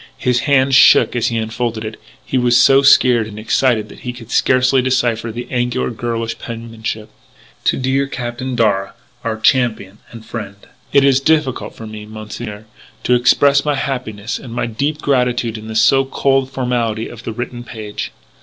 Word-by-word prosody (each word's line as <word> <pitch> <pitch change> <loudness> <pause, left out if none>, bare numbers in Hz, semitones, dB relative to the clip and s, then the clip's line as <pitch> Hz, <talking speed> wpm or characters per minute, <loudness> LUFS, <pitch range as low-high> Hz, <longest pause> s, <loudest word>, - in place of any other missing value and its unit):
His 125 -1 +1
hand 135 -1 +3
shook 130 - +6
as 120 - +1
he 115 - -1
unfolded 110 0 -3
it. 110 0 -7 0.2
He - - -4
was 120 -1 +3
so 135 0 +6
scared 125 -5 +5
and 105 -1 -10
excited 110 0 +1
that - - -13
he 125 - -5
could 120 -1 -12
scarcely 130 +1 +3
decipher 120 -3 0
the 120 +2 -6
angular, 125 0 -1
girlish 115 0 -3
penmanship: 115 -2 -6 0.5
"To - - +2
dear 135 +2 0
Captain 125 0 -4
Darragh, 100 -4 +1 0.3
our 110 -2 -3
champion 110 -4 +1
and 115 -1 -12
friend 105 -4 -6 0.4
"It 140 -1 +5
is 135 -1 +4
difficult 150 -4 0
for 115 - -9
me, 110 -1 -9
Monsieur, 110 0 -8 0.4
to 125 - +2
express 140 +3 +4
my 150 -1 0
happiness 125 -6 -4
and 125 - -10
my - - -1
deep 140 +7 -3
gratitude 125 -4 +1
in 110 0 -8
the 110 - -6
so 135 +5 +4
cold 135 0 +1
formality 120 -4 -2
of 120 -1 -10
the 115 - -5
written 120 +1 -6
page. 110 -3 -6
120 Hz, 175 wpm, -17 LUFS, 110-130 Hz, 0.5 s, shook